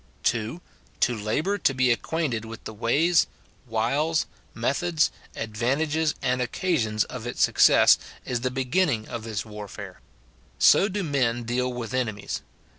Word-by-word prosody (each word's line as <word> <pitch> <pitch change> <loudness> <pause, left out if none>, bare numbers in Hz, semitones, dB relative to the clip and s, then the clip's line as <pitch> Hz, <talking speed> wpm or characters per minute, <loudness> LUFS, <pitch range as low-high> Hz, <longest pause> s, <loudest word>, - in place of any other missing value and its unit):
[2.] 115 +9 -1 0.4
To 120 - +3
labour 150 - -1
to 135 - +2
be 130 -1 +3
acquainted 125 -2 -1
with 115 0 -9
the 110 - -7
ways, 145 +11 +3 0.4
wiles, 140 +8 +1 0.3
methods, 150 +7 +1 0.2
advantages, 140 +8 0
and 125 -1 +1
occasions 120 - 0
of 120 -2 -7
its 120 - 0
success, - - +6 0.3
is 125 -2 -2
the 125 - 0
beginning 130 -1 0
of 115 -2 -5
this 110 -2 -4
warfare. 105 -2 -9 0.6
So 200 - +5
do 200 0 -2
men 125 -6 0
deal 125 +2 -1
with 120 -2 -5
ene 125 -5 0
mies. 105 - -5
125 Hz, 140 wpm, -25 LUFS, 115-155 Hz, 0.6 s, success